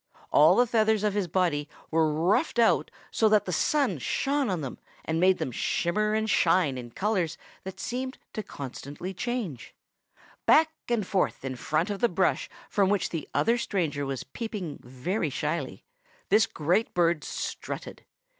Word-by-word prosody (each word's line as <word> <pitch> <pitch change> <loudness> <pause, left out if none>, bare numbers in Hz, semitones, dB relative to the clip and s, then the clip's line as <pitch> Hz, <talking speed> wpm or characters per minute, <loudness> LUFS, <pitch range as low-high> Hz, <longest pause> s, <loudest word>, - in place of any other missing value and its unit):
All - - +6
the 245 - +5
feathers 220 -2 +2
of 210 -2 +1
his 200 -3 0
body 160 -5 0 0.2
were 160 -1 +3
ruffed 180 - +1
out 230 -1 +3 0.2
so 220 - +3
that 210 -1 +4
the 180 - -3
sun 245 - +1
shone 275 - 0
on 180 -4 -1
them 135 -3 -6 0.3
and 160 0 -1
made 185 +1 +4
them 130 - -3
shimmer 210 - 0
and 220 0 0
shine 180 -8 +3
in 125 -2 -7
colors 185 - -1 0.3
that 190 - -7
seemed 260 +2 -4 0.2
to 215 - -3
constantly 145 - -7
change. 205 - -4 0.7
Back 315 0 +6 0.2
and 230 -4 +1
forth 185 -7 0
in 130 -1 -3
front 155 - -1
of 200 - -3
the 240 - +3
brush 185 +2 +1 0.2
from 195 -2 +2
which 205 -2 +1
the 165 -3 -5
other 235 +1 +3
stranger 165 -10 -1
was 135 -2 -3
peeping 195 - -6
very 145 - -2
shyly 150 0 -3 0.4
this 215 -1 +5
great 175 +9 0
bird 170 -3 +2
strutted. - - -5
185 Hz, 165 wpm, -27 LUFS, 155-220 Hz, 0.7 s, All